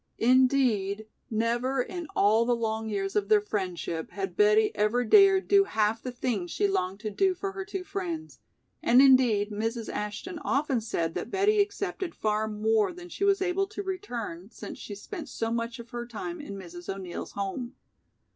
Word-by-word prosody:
Indeed, 240 -5 +3 0.2
never 240 +4 0
in 345 +6 -3
all 215 +3 +4
the 240 +1 +2
long 220 -1 -2
years 195 -2 -2
of 205 -1 0
their 215 -1 +6
friendship 180 -5 -3
had 390 0 -5
Betty 425 +1 +4
ever 230 +4 +1
dared 390 - +6
do 395 -1 +5
half 220 - 0
the 255 - -4
things 235 -7 -2
she 410 - +1
longed 195 - -1
to 215 -1 -3
do 375 - +2
for 390 +2 -4
her 390 0 -5
two 385 -1 -5
friends, 345 -5 -5 0.4
and 245 +2 +5
indeed 250 -6 +5
Mrs. 225 +2 -3
Ashton 210 - -4
often 275 -4 0
said 170 -7 -2
that - - -4
Betty 405 +2 +2
accepted 400 -3 -3
far 215 0 0
more 215 0 +1
than 355 0 -11
she 390 - -4
was 395 -1 +3
able 380 +1 0
to 405 0 -6
return, 240 - -5
since - - -9
she 205 - -7
spent 310 - -7
so 225 0 -2
much 235 +2 -2
of 235 0 -11
her 240 -1 -5
time 315 +9 -6
in 200 -9 -7
Mrs. 175 -1 -7
O'Neill's 190 -3 -6
home. 200 +6 -4
240 Hz, 180 wpm, -28 LUFS, -, 0.4 s, their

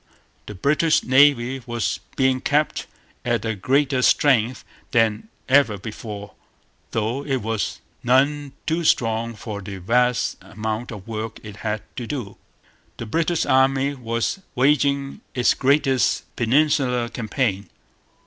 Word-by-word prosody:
The 105 - -7
British 150 - +2
Navy 130 -1 +4
was 120 -3 -1 0.2
being 130 -1 +2
kept 150 +3 0 0.4
at 120 -1 0
a 110 - 0
greater 135 +5 +1
strength 125 -3 +3 0.2
than 115 - +1 0.2
ever 135 -6 +4
before; 105 0 -8 0.6
though 115 +5 -2
it 135 -6 -2
was 110 -1 -2 0.2
none 140 +3 +2
too 165 +2 0
strong 115 -5 +1
for 105 -1 -6
the 100 0 -7
vast 120 +5 +1
amount 110 +3 -4
of 105 -2 -9
work 110 0 -5
it 105 -1 -9
had 110 -1 -3
to 120 -2 -4
do. 125 -8 -5 0.6
The - - -5
British 165 +7 0
Army 135 +1 +3
was 115 - -2 0.2
waging 140 +1 +1
its 125 -1 +3
greatest 135 -1 +1
Peninsular 125 -1 +2
campaign. 110 -4 -2
125 Hz, 125 wpm, -22 LUFS, 110-140 Hz, 0.6 s, Navy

